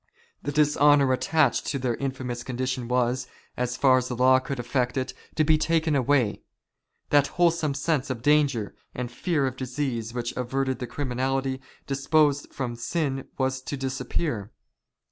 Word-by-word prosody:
The -, -, -3 dB
dishonour 145 Hz, -2 st, +4 dB
attached 145 Hz, 0 st, +2 dB
to 140 Hz, -, -1 dB
their 125 Hz, -2 st, -1 dB
infamous 130 Hz, -3 st, -3 dB
condition 130 Hz, 0 st, -3 dB
was, 125 Hz, +1 st, 0 dB, 0.3 s
so 125 Hz, -, 0 dB
far 130 Hz, +1 st, +4 dB
as 125 Hz, -, -4 dB
the 125 Hz, -, -3 dB
law 130 Hz, +1 st, +5 dB
could 135 Hz, 0 st, -5 dB
effect 125 Hz, +1 st, -1 dB
it, 130 Hz, 0 st, -2 dB, 0.2 s
to 155 Hz, -, +3 dB
be 155 Hz, 0 st, +4 dB
taken 160 Hz, -1 st, +1 dB
away. 130 Hz, -4 st, +2 dB, 0.7 s
That 145 Hz, -1 st, +5 dB
wholesome 170 Hz, -4 st, +2 dB
sense 145 Hz, -1 st, 0 dB
of 120 Hz, -3 st, -4 dB
danger 145 Hz, -7 st, +2 dB, 0.2 s
and 125 Hz, -1 st, -4 dB
fear 150 Hz, +2 st, 0 dB
of 130 Hz, -1 st, -3 dB
disease 125 Hz, -3 st, -3 dB
which 120 Hz, 0 st, -3 dB
averted 130 Hz, +1 st, -1 dB
the 125 Hz, -, -4 dB
criminally 130 Hz, +1 st, -2 dB, 0.2 s
disposed 145 Hz, +1 st, +2 dB
from 125 Hz, -3 st, -4 dB
sin 135 Hz, +2 st, -2 dB
was 130 Hz, 0 st, 0 dB
to 140 Hz, -, -5 dB
dis 135 Hz, 0 st, -3 dB
appear. 120 Hz, -, -2 dB
130 Hz, 160 wpm, -26 LUFS, 125-145 Hz, 0.7 s, law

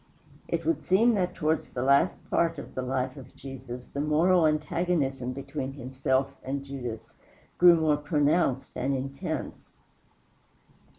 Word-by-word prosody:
It -, -, -2 dB
would 330 Hz, -, +1 dB
seem 220 Hz, +7 st, +4 dB
that 185 Hz, -4 st, 0 dB
towards 160 Hz, -1 st, 0 dB
the 125 Hz, -, -3 dB
last 140 Hz, +6 st, +4 dB, 0.2 s
part 165 Hz, -1 st, +2 dB
of 140 Hz, -, -8 dB
the 130 Hz, -, -3 dB
life 130 Hz, +1 st, -2 dB
of 135 Hz, -, -12 dB
Jesus 125 Hz, -2 st, -8 dB
the 140 Hz, -, -4 dB
moral 160 Hz, +3 st, +4 dB
antagonism 150 Hz, -4 st, 0 dB
between 135 Hz, 0 st, -5 dB
himself 130 Hz, 0 st, -1 dB
and 135 Hz, +1 st, -3 dB
Judas 125 Hz, -5 st, -7 dB, 0.5 s
grew 175 Hz, -1 st, +8 dB
more 155 Hz, -2 st, +2 dB
pronounced 145 Hz, -2 st, +1 dB
and 135 Hz, +1 st, 0 dB
intense. 135 Hz, +1 st, -5 dB
140 Hz, 135 wpm, -28 LUFS, 130-160 Hz, 0.5 s, grew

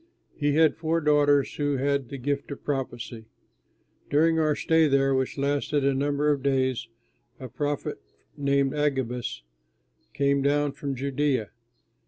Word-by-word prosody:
He 145 Hz, -1 st, 0 dB
had 160 Hz, -2 st, +4 dB
four 160 Hz, 0 st, 0 dB
daughters 145 Hz, -2 st, +3 dB
who 145 Hz, -1 st, 0 dB
had 140 Hz, -1 st, 0 dB
the 140 Hz, -, -6 dB
gift 140 Hz, +2 st, -2 dB
of 140 Hz, -, -8 dB
prophecy. 120 Hz, -5 st, -4 dB, 0.8 s
During 160 Hz, +2 st, +3 dB
our 155 Hz, -2 st, +2 dB
stay 160 Hz, -1 st, +3 dB
there, 135 Hz, -1 st, +2 dB
which 130 Hz, +1 st, -1 dB
lasted 140 Hz, 0 st, 0 dB
a 140 Hz, -, +3 dB
number 145 Hz, +2 st, +1 dB
of 140 Hz, -2 st, -1 dB
days, 130 Hz, -3 st, 0 dB, 0.5 s
a 130 Hz, -, -7 dB
prophet 145 Hz, +4 st, -3 dB, 0.3 s
named 140 Hz, -1 st, +1 dB
Agabus 125 Hz, -, -2 dB, 0.7 s
came 140 Hz, 0 st, +1 dB
down 145 Hz, +1 st, +1 dB
from 140 Hz, 0 st, -5 dB
Judea. 135 Hz, -3 st, -1 dB
140 Hz, 140 wpm, -26 LUFS, 135-145 Hz, 0.8 s, had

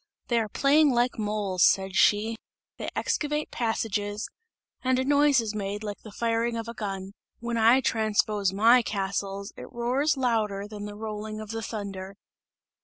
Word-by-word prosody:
"They 235 Hz, -1 st, +3 dB
are 220 Hz, -2 st, -2 dB
playing 290 Hz, +6 st, +4 dB
like 240 Hz, 0 st, +1 dB
moles," 205 Hz, -4 st, 0 dB
said 190 Hz, 0 st, +3 dB
she, 215 Hz, +2 st, +3 dB, 0.4 s
"they -, -, -3 dB
excavate 300 Hz, 0 st, -1 dB
passages, 210 Hz, -3 st, -2 dB, 0.6 s
and 255 Hz, 0 st, +2 dB
a 260 Hz, -, 0 dB
noise 285 Hz, -1 st, +4 dB
is 220 Hz, -2 st, -2 dB
made 205 Hz, 0 st, -4 dB
like 205 Hz, -1 st, -5 dB
the 215 Hz, -, -12 dB
firing 230 Hz, +1 st, 0 dB
of 230 Hz, 0 st, -5 dB
a 235 Hz, -, -5 dB
gun. 195 Hz, -3 st, -5 dB, 0.3 s
When 235 Hz, 0 st, -4 dB
I 230 Hz, +3 st, +5 dB
transpose 215 Hz, -4 st, +1 dB
my 230 Hz, +5 st, +5 dB
castles, 200 Hz, -1 st, -3 dB
it -, -, -10 dB
roars 265 Hz, +5 st, 0 dB
louder 215 Hz, -6 st, 0 dB
than 210 Hz, -1 st, -7 dB
the 205 Hz, 0 st, -7 dB
rolling 215 Hz, 0 st, -5 dB
of 215 Hz, 0 st, -7 dB
the 225 Hz, 0 st, -4 dB
thunder!" 200 Hz, -3 st, -6 dB
220 Hz, 165 wpm, -27 LUFS, 205-235 Hz, 0.6 s, I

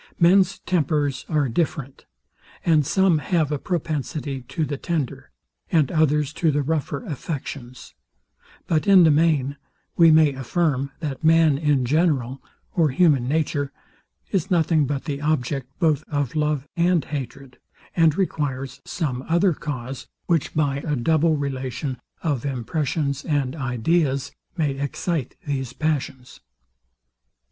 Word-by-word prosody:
Men's 185 Hz, +2 st, +5 dB
tempers 150 Hz, -5 st, -1 dB
are 150 Hz, -3 st, +2 dB
different, 140 Hz, 0 st, -2 dB, 0.6 s
and 160 Hz, -3 st, +4 dB
some 190 Hz, -3 st, +3 dB
have 155 Hz, 0 st, 0 dB
a 145 Hz, -, -1 dB
propensity 150 Hz, -4 st, -3 dB
to 160 Hz, -3 st, -1 dB
the 145 Hz, -, -3 dB
tender, 140 Hz, -4 st, -3 dB, 0.4 s
and 155 Hz, -6 st, +3 dB
others 150 Hz, -2 st, +2 dB
to 165 Hz, -, +4 dB
the 145 Hz, -1 st, +1 dB
rougher, 160 Hz, -, -2 dB
affections: 135 Hz, -, -6 dB, 0.7 s
But 160 Hz, +4 st, 0 dB
in 195 Hz, -3 st, +8 dB
the 160 Hz, -, +6 dB
main, 145 Hz, -3 st, +2 dB, 0.4 s
we 165 Hz, -1 st, +7 dB
may 155 Hz, -2 st, +5 dB
affirm, 135 Hz, +1 st, 0 dB
that 145 Hz, -2 st, -4 dB
man 160 Hz, -3 st, +4 dB
in 145 Hz, -4 st, +2 dB
general, 135 Hz, -3 st, +1 dB, 0.3 s
or 165 Hz, -4 st, +3 dB
human 140 Hz, -3 st, +3 dB
nature, 145 Hz, -1 st, 0 dB, 0.6 s
is 185 Hz, -5 st, 0 dB
nothing 160 Hz, -4 st, +2 dB
but 140 Hz, -1 st, -3 dB
the 145 Hz, -2 st, -3 dB
object 140 Hz, -3 st, -1 dB
both 155 Hz, -4 st, +2 dB
of 145 Hz, -4 st, -2 dB
love 150 Hz, -2 st, 0 dB
and 170 Hz, -3 st, +2 dB
hatred, 135 Hz, -2 st, -7 dB, 0.4 s
and 165 Hz, -3 st, +4 dB
requires 135 Hz, -8 st, -2 dB
some 130 Hz, -7 st, -3 dB
other 170 Hz, +2 st, +3 dB
cause, 135 Hz, -3 st, -6 dB, 0.2 s
which 165 Hz, -4 st, 0 dB
by 145 Hz, -3 st, +1 dB
a 150 Hz, 0 st, -2 dB
double 155 Hz, +5 st, +2 dB
relation 130 Hz, -1 st, -3 dB, 0.2 s
of 145 Hz, -7 st, -1 dB
impressions 140 Hz, +2 st, -2 dB
and 145 Hz, -3 st, -1 dB
ideas, 135 Hz, +1 st, 0 dB, 0.3 s
may 150 Hz, -4 st, +1 dB
excite 140 Hz, 0 st, -2 dB
these 135 Hz, -4 st, -3 dB
passions. 140 Hz, -5 st, -3 dB
150 Hz, 130 wpm, -23 LUFS, 135-160 Hz, 0.7 s, in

